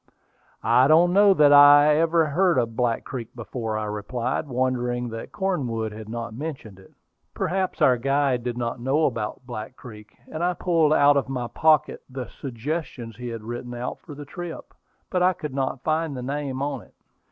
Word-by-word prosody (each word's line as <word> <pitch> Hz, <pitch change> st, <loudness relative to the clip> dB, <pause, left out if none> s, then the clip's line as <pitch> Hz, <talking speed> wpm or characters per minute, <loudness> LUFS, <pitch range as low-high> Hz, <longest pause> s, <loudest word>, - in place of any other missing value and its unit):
"I 125 Hz, +3 st, +4 dB
don't 170 Hz, +4 st, +5 dB
know 200 Hz, 0 st, +6 dB
that 145 Hz, -3 st, +6 dB
I 145 Hz, +1 st, +8 dB
ever 165 Hz, 0 st, +3 dB
heard 175 Hz, +2 st, +2 dB
of 115 Hz, -2 st, 0 dB
Black 120 Hz, -2 st, 0 dB
Creek 125 Hz, -4 st, -7 dB
before," 115 Hz, -1 st, -4 dB
I 110 Hz, -, -3 dB
replied, 115 Hz, +7 st, -3 dB
wondering 125 Hz, -1 st, -1 dB
that 115 Hz, 0 st, -7 dB
Cornwood 130 Hz, -, -2 dB
had 110 Hz, 0 st, -9 dB
not 115 Hz, -1 st, -5 dB
mentioned 130 Hz, -7 st, -7 dB
it. 95 Hz, -, -19 dB, 0.4 s
Perhaps 190 Hz, +1 st, -1 dB
our 125 Hz, -1 st, +5 dB
guide 135 Hz, -1 st, +1 dB
did 120 Hz, -1 st, -3 dB
not 120 Hz, 0 st, -3 dB
know 135 Hz, +6 st, +1 dB
about 115 Hz, 0 st, -3 dB
Black 120 Hz, 0 st, -7 dB
Creek; 110 Hz, -4 st, -13 dB
and 160 Hz, +2 st, -5 dB
I 180 Hz, +1 st, +1 dB
pulled 165 Hz, -4 st, +2 dB
out 145 Hz, -1 st, +5 dB
of 135 Hz, -, -1 dB
my 125 Hz, -2 st, -3 dB
pocket 155 Hz, +4 st, +2 dB
the 130 Hz, -1 st, -6 dB
"Suggestions" 130 Hz, -2 st, -5 dB
he 125 Hz, 0 st, -6 dB
had 115 Hz, -2 st, -6 dB
written 120 Hz, +2 st, -6 dB
out 120 Hz, +1 st, -5 dB
for 150 Hz, -, -11 dB
the 145 Hz, 0 st, -9 dB
trip; 175 Hz, +3 st, -8 dB, 0.4 s
but 180 Hz, -, 0 dB
I 185 Hz, +1 st, +4 dB
could 150 Hz, -5 st, -7 dB
not 135 Hz, -1 st, -2 dB
find 155 Hz, -3 st, -1 dB
the 125 Hz, -, -5 dB
name 140 Hz, 0 st, -3 dB
in 140 Hz, -4 st, -3 dB
it. -, -, -21 dB
130 Hz, 185 wpm, -24 LUFS, 120-150 Hz, 0.4 s, I